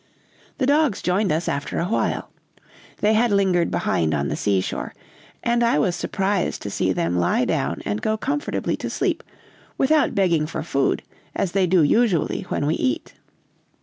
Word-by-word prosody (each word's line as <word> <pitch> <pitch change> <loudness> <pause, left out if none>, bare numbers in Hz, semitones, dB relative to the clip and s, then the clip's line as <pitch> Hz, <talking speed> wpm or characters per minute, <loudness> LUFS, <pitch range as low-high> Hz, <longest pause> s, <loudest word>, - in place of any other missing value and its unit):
The 265 - +1
dogs 285 -4 +2
joined 185 +1 +1
us 160 +2 -1
after 140 - -2
a 170 - 0
while. 210 - -1 0.7
They 210 +1 +4
had 230 +2 +3
lingered 190 -4 +2
behind 80 -2 0
on 70 -1 -1
the - - -1
seashore, 95 -2 -1 0.5
and 235 0 +2
I 235 - +3
was 175 +4 +1
surprised 195 -2 -1
to 100 - -4
see 95 - 0
them 90 -1 0
lie 85 - +2
down - - -1
and 105 +1 -2
go 220 0 0
comfortably 285 +6 -2
to - - -4
sleep - - -1 0.6
without 300 -2 +2
begging 170 -6 +2
for 165 - -4
food, 140 -4 0 0.3
as 195 -3 -1
they 190 -1 +2
do 180 -2 +4
usually 190 +1 +1
when - - -1
we 150 - +1
eat. 125 -6 -2
180 Hz, 170 wpm, -22 LUFS, 145-220 Hz, 0.7 s, They